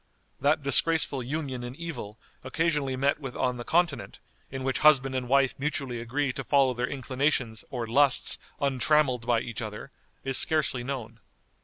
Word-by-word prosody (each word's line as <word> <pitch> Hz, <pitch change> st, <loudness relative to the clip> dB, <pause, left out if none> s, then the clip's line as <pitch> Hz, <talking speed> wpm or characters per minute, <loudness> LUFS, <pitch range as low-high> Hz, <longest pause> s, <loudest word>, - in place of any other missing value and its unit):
That 145 Hz, +1 st, +2 dB
disgraceful 140 Hz, 0 st, +2 dB
union 130 Hz, -1 st, -4 dB
in 120 Hz, +1 st, -7 dB
evil 150 Hz, -11 st, -7 dB, 0.3 s
occasionally 145 Hz, -1 st, 0 dB
met 140 Hz, +3 st, +1 dB
with 135 Hz, -4 st, -7 dB
on 125 Hz, -1 st, -1 dB
the 120 Hz, -, -6 dB
Continent, 160 Hz, -, 0 dB, 0.3 s
in 135 Hz, 0 st, -6 dB
which 135 Hz, 0 st, -1 dB
husband 135 Hz, -3 st, +5 dB
and 125 Hz, -2 st, -3 dB
wife 135 Hz, -1 st, +3 dB
mutually 135 Hz, -4 st, -2 dB
agree 135 Hz, +3 st, -2 dB
to 135 Hz, -, -5 dB
follow 135 Hz, -1 st, +3 dB
their 125 Hz, +1 st, -2 dB
inclinations 130 Hz, -3 st, -1 dB
or 120 Hz, -3 st, -4 dB
lusts 135 Hz, +5 st, +3 dB, 0.2 s
untrammeled 135 Hz, -2 st, +1 dB
by 120 Hz, -2 st, +2 dB
each 120 Hz, -1 st, -6 dB
other, 110 Hz, +4 st, -7 dB, 0.3 s
is 135 Hz, -1 st, +3 dB
scarcely 150 Hz, -6 st, +1 dB
known. 120 Hz, -4 st, -6 dB
135 Hz, 160 wpm, -27 LUFS, 125-145 Hz, 0.3 s, husband